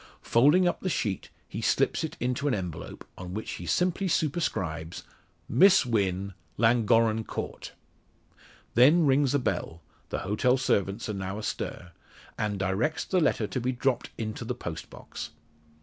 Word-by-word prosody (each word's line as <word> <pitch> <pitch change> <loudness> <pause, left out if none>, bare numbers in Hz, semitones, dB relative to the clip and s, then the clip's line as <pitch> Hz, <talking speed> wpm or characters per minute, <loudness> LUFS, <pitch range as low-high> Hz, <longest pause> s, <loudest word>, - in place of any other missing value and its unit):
Folding 150 +10 +5
up - - 0
the 185 - -1
sheet, 100 - -2 0.2
he - - -5
slips - - +1
it - - -4
into 125 +4 -1
an 135 - +2
envelope, 90 -5 -6
on 90 +1 -6
which 110 - -4
he 85 - -8
simply 180 +2 +1
superscribes 95 - -1 0.4
Miss 190 -4 +6
Wynn, 100 -4 0 0.2
Llangorren 115 -1 +3
Court. - - -6 1.0
Then 150 +8 +6
rings 140 0 +3
a - - +5
bell 90 - -3 0.3
the - - -3
hotel 125 +6 +2
servants 100 -4 0
are 105 - -2
now 95 0 -4
astir 90 -4 -4 0.4
and 105 -2 -2
directs 95 +11 0
the 185 - +1
letter 145 -8 +2
to 130 +4 -3
be 125 +2 0
dropped 130 0 0
into 110 -1 -4
the - - -3
post - - -6
box. 75 - -8
115 Hz, 150 wpm, -28 LUFS, 95-140 Hz, 1.0 s, Miss